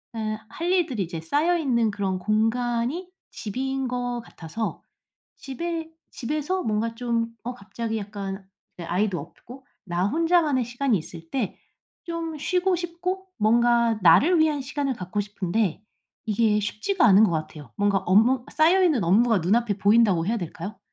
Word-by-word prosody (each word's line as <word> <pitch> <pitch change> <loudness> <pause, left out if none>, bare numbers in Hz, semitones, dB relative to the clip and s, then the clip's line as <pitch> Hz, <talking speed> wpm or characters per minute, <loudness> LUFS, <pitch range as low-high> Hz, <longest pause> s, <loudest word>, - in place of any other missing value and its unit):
예 215 -1 -3
할 340 +10 -3
일들이 320 - +1
이제 170 -1 -6
쌓여 300 - +1
있는 235 -8 +1
그런 195 -2 -2
공간이 235 - 0 0.2
집인 265 +4 -3
것 245 -1 -2
같아서 175 +3 -5 0.5
집에 325 +4 -5 0.2
집에서 305 +8 -2
뭔가 225 +1 -1
좀 235 -1 -1 0.2
어 245 +2 -4
갑자기 225 0 -5
약간 200 -2 -6 0.3
이제 175 - -6
아이도 180 +1 0
없고 235 - -12 0.2
나 175 0 0
혼자만의 320 -1 +2
시간이 240 0 0
있을 165 0 -10
때 235 -5 -2 0.5
좀 330 -2 -4
쉬고 360 +5 +1
싶고 355 +2 -4
뭔가 235 +1 +3
나를 275 - +6
위한 310 -2 +2
시간을 280 0 -2
갖고 195 -1 -3
싶은데 205 -1 -2 0.5
이게 215 0 +2
쉽지가 215 - -1
않은 200 0 +7
것 210 - +3
같아요. 155 -5 -5
뭔가 205 -1 +2
업무 225 +7 +3
쌓여 340 +5 +4
있는 300 - +3
업무가 210 +4 +3
눈 180 +6 +3
앞에 225 -4 0
보인다고 205 -5 +4
해야 230 +2 +1
될까요? 180 +2 -6
230 Hz, 305 characters per minute, -25 LUFS, 200-285 Hz, 0.5 s, 않은